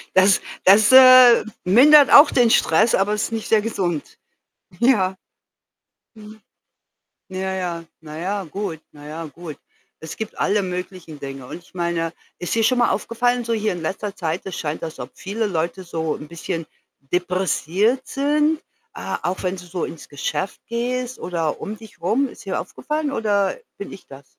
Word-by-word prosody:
das 190 +1 +5 0.2
das, 210 +4 +6
äh, 255 -2 +9 0.2
mindert 275 +9 +7
auch 290 - +9
den 245 -2 +4
Stress, 220 -1 +3
aber 200 +2 +1
ist 210 +2 -2
nicht 225 -1 -4
sehr 220 -1 +4
gesund, 185 -8 -3 0.6
ja. 195 -7 +3 1.0
Mhm. 215 0 -13 0.9
Ja, 190 0 -3
ja. 175 -3 -4 0.2
Na, 155 0 -9
ja, 195 +3 -2
gut. 165 -2 -5
Na 145 0 -13
ja, 160 +2 -6
gut. 155 0 -10 0.4
Es 160 - -8
gibt 220 -1 -6
alle 205 0 +1
möglichen 180 -4 -7
Dinge. 135 -2 -8
Und - - -8
ich - - -24
meine, 170 -2 -2 0.3
ist 175 - -3
dir 225 - +2
schon 245 +2 +2
mal 240 - +3
aufgefallen 245 +3 -1
so 230 - -1
hier 215 -1 0
in 175 - -7
letzter 195 +4 -4
Zeit, 165 0 -3
es 195 - -6
scheint, 155 0 -4
als 160 - -7
ob 125 +1 -7
viele 215 +3 -3
Leute 175 0 -3
so 160 -3 -3
'n 150 - -10
bisschen 165 0 -5 0.5
depressiv 185 +6 0
sind, 300 +3 +1 0.3
ah, - - -4
auch 180 +1 -2
wenn 185 +1 -1
du 180 - -10
so 175 0 -4
ins 165 - -10
Geschäft 165 +6 -4
gehst 250 +2 -3
oder 165 -4 -3
um 210 - -5
dich 215 -3 -15
rum, 250 +10 +1
ist - - -14
hier - - -3
aufgefallen 300 -1 -4
oder 205 - 0 0.2
bin 200 - -7
ich - - -13
das? 135 0 -13
190 Hz, 170 wpm, -21 LUFS, 170-230 Hz, 1.0 s, äh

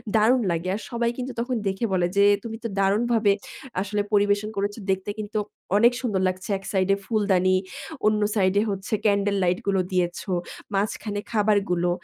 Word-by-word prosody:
দারুণ 230 +4 +4
লাগে। 170 +2 -2
আর 210 - -5
সবাই 235 -1 0
কিন্তু 255 0 -4
তখন 245 +2 -1
দেখে 195 +4 -1
বলে 180 -2 +2
যে, 200 - +6 0.2
"তুমি 225 -1 -5
তো - - -1
দারুণভাবে 210 +2 +3 0.5
আসলে 205 +1 -1
পরিবেশন 205 +1 +2
করেছ। 200 +1 -1 0.2
দেখতে 190 +1 -2
কিন্তু 215 +1 -2 0.4
অনেক 235 +3 +6
সুন্দর 210 -7 0
লাগছে। 185 +2 -4
এক 195 - -14
সাইড 190 -1 +1
এ - - -7
ফুলদানি, 190 -4 +2 0.5
অন্য 215 0 +2
সাইডে 195 0 +3
হচ্ছে 195 +1 -4
ক্যান্ডেল 200 -1 +2
লাইট 180 0 +1
গুলো 195 -1 +3
দিয়েছ। 180 -1 0 0.5
মাঝখানে 205 +1 -1
খাবারগুলো।" 200 -5 +2
205 Hz, 165 wpm, -24 LUFS, 190-215 Hz, 0.5 s, যে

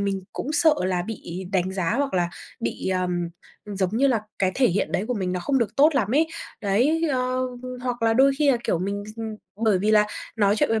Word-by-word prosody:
mình 195 -1 -1
cũng 295 - -4
sợ 315 0 +5
là 180 -1 0
bị 190 -3 -6
đánh 185 -1 +1
giá 190 +1 0
hoặc 280 -5 -1
là 175 -1 +2 0.3
bị, 115 - -3
ờm, 180 -2 -1 0.4
ừm, 205 -1 -7
giống 190 -2 +1
như 250 +5 +3
là 245 -5 +2 0.2
cái 190 -1 +1
thể 265 - +4
hiện 195 0 0
đấy 195 - 0
của 250 - 0
mình 185 -3 -2
nó 180 - -2
không 270 +8 +1
được 235 -4 -1
tốt 300 +3 +5
lắm 230 -3 +1
ấy. 315 +3 +4 0.3
Đấy, 245 +12 +2
ơ, 255 0 0 0.4
hoặc 245 -2 -3
là 225 0 +3
đôi 270 +3 +5
khi 295 -2 +4
là 260 - +3
kiểu, 170 - +1
mình 200 +3 -3
x 215 +1 -11
ừm 220 -1 -4 0.3
bởi 210 -4 +4
vì 210 +3 +1
là 210 -1 +5 0.3
nói 205 -1 +3
chuyện - - +2
với 225 -1 +2
215 Hz, 245 wpm, -24 LUFS, 190-255 Hz, 0.4 s, sợ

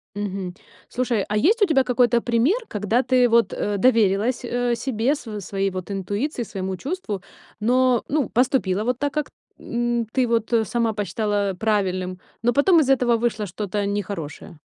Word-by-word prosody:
Мгм. 195 -3 -4 0.4
Слушай, 240 -4 0
а 210 - 0
есть 415 - +3
у - - +7
тебя 295 -7 +3
какой-то 245 -2 +2
пример, 240 - +2
когда 210 +4 0
ты 250 -1 +3
вот, 230 0 +3
э, 205 0 -2
доверилась, 225 +1 +2
э, 245 0 0
себе, 245 +2 0
с 220 -7 -7
своей 195 0 -2
вот 185 0 -6
интуиции, 205 - -2
своему 190 -3 -4
чувству, 240 - -4 0.4
но 250 +2 +3
ну, 290 -3 0
поступила 230 -6 +1
вот 250 +2 -1
так, 285 0 -1
как 300 -1 -2 0.3
н 240 0 -1
ты 255 0 +1
вот, 230 -1 0
э, 225 -1 +3
сама 230 +2 0
посчитала 205 -1 -1
правильным, 185 -4 -1 0.2
но 240 +2 +2
потом 325 +7 +4
из 275 - 0
этого 250 -3 +3
вышло 225 -2 -1
что-то 205 +2 -3
нехорошее? 195 -4 -5
230 Hz, 165 wpm, -23 LUFS, 200-250 Hz, 0.4 s, у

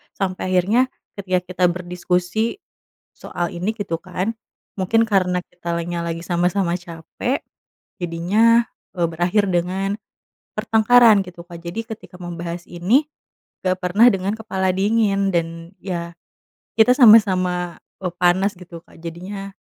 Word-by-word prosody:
Sampai 185 -1 -2
akhirnya 215 +8 +3 0.3
ketika 185 -2 0
kita 180 - -1
berdiskusi 180 - -1 0.6
soal 175 -1 -4
ini, 180 +4 -1
gitu 205 -7 -3
kan, 185 +4 -3 0.4
mungkin 225 +4 +2
karena 185 -3 +2
kitanya 170 -1 -4
lagi 165 0 -3
sama-sama 175 0 +1
capek, 175 - -4 0.6
jadinya, 205 +8 +3 0.3
eee, 170 -1 +2
berakhir 175 +5 +1
dengan 185 +3 0 0.6
pertengkaran 220 -1 +5
gitu, 175 -1 -11
Kak. 175 -1 -9
Jadi 175 +7 -4
ketika 210 -4 -10
membahas 170 0 -5
ini 205 - +2 0.5
nggak 185 -1 0
pernah 200 +7 +5
dengan 195 0 -1
kepala 190 -4 0
dingin 200 0 +2
dan 165 +2 -3
ya 170 -3 -4 0.6
kita 225 +2 +6
sama-sama, 185 -7 +5 0.2
eee, 180 - -1
panas 185 +2 +2
gitu, 175 -2 -11
Kak, - - -20
jadinya, 195 +4 -7
185 Hz, 120 wpm, -21 LUFS, 175-205 Hz, 0.6 s, kita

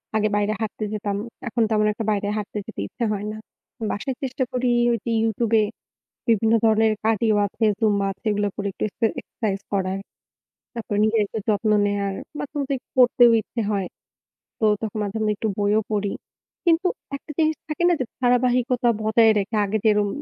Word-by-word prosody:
আগে 215 0 +3
বাইরে 205 +1 +1
হাঁটতে 215 0 -3
যেতাম, 205 -1 -2 0.3
এখন 235 0 +1
তেমন 215 -1 +2
একটা 220 0 -4
বাইরে 205 0 0
হাঁটতে 210 0 -5
যেতে - - -6
ইচ্ছে 235 - -3
হয় 205 0 -4
না। 215 - -7 0.5
বাসায় 255 +5 -3
চেষ্টা 260 0 -1
করি 250 0 0 0.2
ওই 235 - +2
যে 235 - -1
YouTube 225 0 0
এ - - +3 0.7
বিভিন্ন 225 0 +3
ধরনের 220 0 +4
cardio 220 0 +2
আছে, 210 - -5 0.2
Zumba 205 -3 +2
আছে 195 - -14
এগুলা 205 0 0
করে 205 - -3
একটু - - -6
এক্সে 225 - 0
exercise 195 -4 -4
করার। 190 0 0 0.8
তারপরে 215 -3 -3
নিজের 220 +1 +2
একটু 220 - -5
যত্ন 215 +1 +2 0.2
নেয়ার। 200 -1 -1 0.3
মাঝেমধ্যে 280 -1 -3
একটু - - -48
পড়তেও 245 -1 +6
ইচ্ছে 230 +2 -6
হয়, 195 -3 0 0.7
তো - - -5 0.2
তখন 220 -1 -4
মাঝেমধ্যে 210 +1 -1
একটু 220 0 -1
বইও 205 +2 +3
পড়ি। 205 -1 0 0.6
কিন্তু 340 +2 +3 0.3
একটা 300 - -9
জিনিস 315 -1 +3
থাকে 310 +2 -2
না? 350 - +4
যে 255 - 0 0.2
ধারাবাহিকতা 245 0 +2
বজায় 220 +1 +5
রেখে 205 +3 -3
আগে 210 +2 0
যেরম 210 -1 +4
220 Hz, 175 wpm, -23 LUFS, 205-240 Hz, 0.8 s, পড়তেও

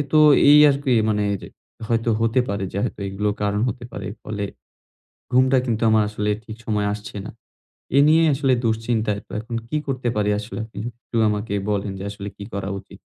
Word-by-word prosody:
তো 155 - +6 0.3
এই 150 - +9
আরকি, 140 -1 0 0.2
মানে 105 -1 +1
এইযে 100 - -5 0.4
হয়তো 115 0 0
হতে 115 +3 +3
পারে 100 -1 -2
যে 100 - -3
হয়তো - - -4
এগুলো 100 +2 -1
কারণ 105 0 0
হতে 120 +1 -5
পারে। 100 -2 -5
ফলে 105 -1 -4 0.9
ঘুমটা 130 +1 +4
কিন্তু 115 -3 -1
আমার 110 -1 +4
আসলে 105 0 -2 0.2
ঠিক 110 +1 -8
সময়ে 105 -2 0
আসছে 105 0 -8
না। - - -6 0.7
এ - - +7
নিয়েই 160 +1 +5
আসলে 135 -1 +1
দুশ্চিন্তায়। 110 -2 0
তো - - -58
এখন 115 +2 -7
কি 155 - -2
করতে 130 -3 -2
পারি 105 -1 +1
আসলে? 105 +3 -6
আপনি 110 - -11
একটু 120 0 -10
আমাকে 105 0 -2 0.2
বলেন 100 -1 -1
যে, - - -6
আসলে 100 0 -7
কি 100 - -8
করা 100 -1 -3
উচিত? - - -16
110 Hz, 190 wpm, -22 LUFS, 105-120 Hz, 0.9 s, এই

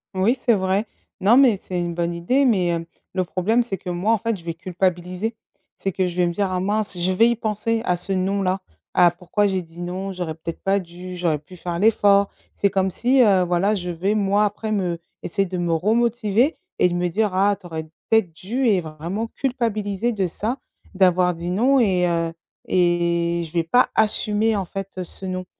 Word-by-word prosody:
Oui, 195 +7 +3
c'est 240 -2 +3
vrai. 190 +2 0 0.3
Non 215 +6 +5
mais 260 -5 +6
c'est 180 -1 -4
une 175 -1 -2
bonne 170 0 -1
idée, 250 +12 +2
mais, 195 -8 +3
hem, 170 -1 -1 0.3
le 185 0 +1
problème 190 +7 +1
c'est 230 -5 -3
que 180 - -6
moi, 180 +6 +1
en - - +3
fait, 230 +1 -1
je 180 - -12
vais 165 -1 -4
culpabiliser. 180 +4 -2 0.4
C'est 195 - -2
que 185 0 0
je 175 - -5
vais 180 -1 +2
me 175 - -1
dire: 195 +1 -1
«Ah 185 - 0
mince!», 205 0 -1
je 175 +2 +1
vais 225 +5 +4
y 235 - +1
penser 225 0 -1
à 180 - +2
ce 175 +3 -5
non-là, 190 0 0 0.4
à 175 -1 +6
pourquoi 180 +4 0
j'ai 190 -2 -1
dit: 165 0 -12
«Non», 185 +2 -4
j'aurais 175 -3 -4
peut-être 165 +1 -7
pas 195 +1 +2
dû, 180 0 -9
j'aurais 170 -4 0
pu 180 +5 -15
faire 175 0 -4
l'effort, 200 0 +4 0.2
c'est 200 - +2
comme 190 0 +1
si, 250 +7 +2
heu, 195 -5 +5
voilà, 180 +4 +1
je 180 -3 -4
vais, 190 +5 0
moi, 205 0 +2
après 210 +1 -3
me 185 -5 0 0.2
essayer 195 +3 -1
de 185 0 -4
me 170 -1 0
remotiver 230 - +2 0.2
et 180 - +5
de - - -3
me 175 0 0
dire: 215 +5 +1
«Ah, 200 +2 +3
tu 185 - -12
aurais 160 -2 -4 0.3
peut-être 220 -7 +3
dû» 235 +11 -2
et 200 -5 +3
vraiment 165 +8 -4
culpabiliser 225 -4 -1
de 200 -4 -1
ça, 220 +9 -3 0.4
d'avoir 180 -1 +4
dit: 170 +1 -5
«Non» 255 +8 +3
et 185 -6 +3
heu 165 -1 -1 0.4
et 170 -1 +2
je - - -16
vais 170 -1 +1
pas 245 +10 +3
assumer, 215 0 +2
en 195 -2 -1
fait, 195 +2 -5
heu, 185 - -2
ce 185 +2 -10
non. 185 0 -4
190 Hz, 215 wpm, -22 LUFS, 175-215 Hz, 0.4 s, mais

